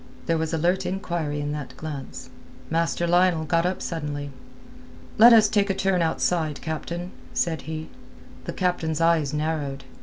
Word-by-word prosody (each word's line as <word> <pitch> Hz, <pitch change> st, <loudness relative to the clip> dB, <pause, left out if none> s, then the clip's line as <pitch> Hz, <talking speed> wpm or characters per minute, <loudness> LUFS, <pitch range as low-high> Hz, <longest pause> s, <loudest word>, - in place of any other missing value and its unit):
There 165 Hz, -1 st, +1 dB
was 160 Hz, -1 st, -1 dB
alert 170 Hz, +3 st, +1 dB
inquiry 170 Hz, -6 st, -2 dB
in 145 Hz, 0 st, -2 dB
that 150 Hz, -3 st, -6 dB
glance. 145 Hz, -4 st, -7 dB, 0.4 s
Master 165 Hz, +1 st, +1 dB
Lionel 175 Hz, -2 st, +3 dB
got 165 Hz, +3 st, +2 dB
up 185 Hz, -, -3 dB
suddenly. 145 Hz, -3 st, -4 dB, 0.9 s
"Let 235 Hz, +2 st, +10 dB
us 220 Hz, -2 st, +7 dB
take 205 Hz, -1 st, +1 dB
a 195 Hz, -, +1 dB
turn 190 Hz, -2 st, +1 dB
outside, 160 Hz, -2 st, 0 dB
captain," 170 Hz, +3 st, -5 dB, 0.2 s
said 165 Hz, -2 st, 0 dB
he. 160 Hz, 0 st, -4 dB, 0.6 s
The -, -, -4 dB
captain's 170 Hz, -4 st, -1 dB
eyes 165 Hz, -4 st, +3 dB
narrowed. 150 Hz, -3 st, -2 dB
165 Hz, 150 wpm, -25 LUFS, 150-180 Hz, 0.9 s, Let